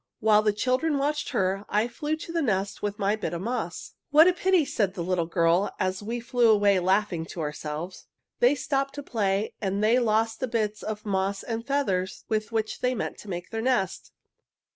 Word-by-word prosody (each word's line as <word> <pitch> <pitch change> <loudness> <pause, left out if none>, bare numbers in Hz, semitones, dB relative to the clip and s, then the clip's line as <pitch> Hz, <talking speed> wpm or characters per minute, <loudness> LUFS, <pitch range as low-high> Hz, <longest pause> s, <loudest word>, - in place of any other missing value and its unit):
"While 215 -1 +5
the 215 0 +2
children 255 +8 0
watched 295 +2 -1
her 195 -5 0
I 210 +3 +2
flew 295 +6 -3
to 320 +1 -8
the 335 -1 0
nest 200 -6 -1
with 205 0 -2
my 200 +1 +1
bit 185 -6 -4
of 170 - -4
moss. 225 -7 -4 0.2
"'What 310 +3 +7
a 365 - +5
pity!' 370 -3 +2
said 200 -7 -1
the 175 - -3
little 175 -2 0
girl, 170 +3 +2
as 185 +1 -1
we 230 +4 -3
flew 240 0 +2
away 205 -3 +4
laughing 185 -2 +1
to 180 - -8
ourselves. 150 +3 -5 0.3
'They 250 +4 +5
stopped 275 0 -1
to 285 - -6
play 205 -4 -1
and 200 0 -1
they 230 +4 +4
lost 225 -1 +1
the 260 - -1
bits 215 -3 -1
of 215 0 -5
moss 195 0 -1
and 230 0 -4
feathers 195 -10 -1
with 215 0 -1
which 220 -1 -2
they 250 0 0
meant - - -4
to 210 - -11
make 175 -1 -5
their 225 -1 -2
nest!' 240 -6 -1
215 Hz, 205 wpm, -26 LUFS, 190-250 Hz, 0.3 s, What